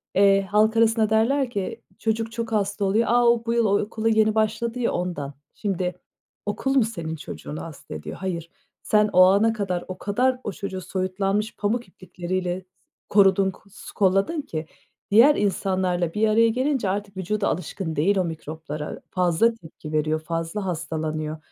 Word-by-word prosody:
eee, 195 0 +5
halk 215 +3 +2
arasında 225 -1 +3
derler 245 +4 +2
ki 200 -5 -4 0.2
çocuk 225 0 -1
çok 230 -1 -4
hasta 205 -1 0
oluyor. 215 +4 +2
A, 240 0 +4
o 235 0 +3
bu 230 - 0
yıl 235 -1 +3
o 200 -1 +3
okula 220 +1 -1
yeni 220 0 +3
başladı 225 +3 0
ya, 235 - +1
ondan. 150 -6 -3 0.2
Şimdi 180 -3 -2 0.5
okul 270 +6 -1
mu 260 - +5
senin 170 -8 -4
çocuğunu 155 0 -7
hasta 140 - -9
ediyor? 75 - -7
Hayır. 170 -3 -4 0.3
Sen 210 -1 +3
o 185 - +7
ana 200 +4 +4
kadar 190 -5 -2
o 185 0 -6
kadar 250 +7 +1
o 210 - -3
çocuğu 195 -2 -5
soyutlanmış, 195 +4 -1
pamuk 220 +2 -1
iplikleriyle 180 0 -4 0.4
korudun, 195 -1 +4
k - - -18
s 200 - -12
kolladın 195 - +2
ki 155 - -5 0.5
diğer 250 +8 +7
insanlarla 185 -3 0
bir 220 +1 +2
araya 230 +2 +4
gelince 255 -2 0
artık 200 0 -3
vücudu 200 +3 -1
alışkın 170 -1 -3
değil 190 +7 +2
o 185 - +2
mikroplara. 155 -2 -6
Fazla 180 +5 +3
tepki 160 -6 -11
veriyor, 155 +1 +1
fazla 165 +5 -3
hastalanıyor. 155 -2 -3
195 Hz, 165 wpm, -24 LUFS, 175-220 Hz, 0.5 s, o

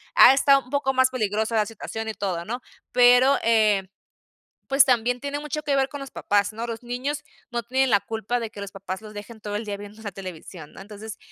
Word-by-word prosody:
ha - - +9
estado 275 0 +4
un 250 - -18
poco 280 -2 +1
más 260 0 +4
peligrosa 220 -2 -1
la 215 -1 +3
situación 225 0 -6
y - - -3
todo, 185 -5 -3
¿no?, 245 +5 -4 0.3
pero, 250 +2 +6
eh 215 -3 +3 0.9
pues 275 +1 +7
también 245 -1 +1
tiene 285 0 -3
mucho 300 0 -4
que 285 -1 +1
ver 270 0 +2
con 285 -1 -8
los 275 - -8
papás, 205 0 +1
¿no?, 225 +2 -5
los 230 0 -6
niños 260 +5 -3 0.3
no 235 -1 -2
tienen 260 +3 +1
la 200 -2 +4
culpa 225 +2 -3
de 225 - -4
que 205 - -11
los 200 -1 -7
papás 195 0 -6
los 215 -1 -11
dejen 215 +2 -9
todo 205 -1 -5
el 210 - -2
día 205 -2 -4
viendo 205 +2 -11
la 205 -2 -5
televisión, 180 -4 -9
¿no?, - - -11
entonces 210 +1 -9
225 Hz, 230 wpm, -24 LUFS, 205-260 Hz, 0.9 s, ha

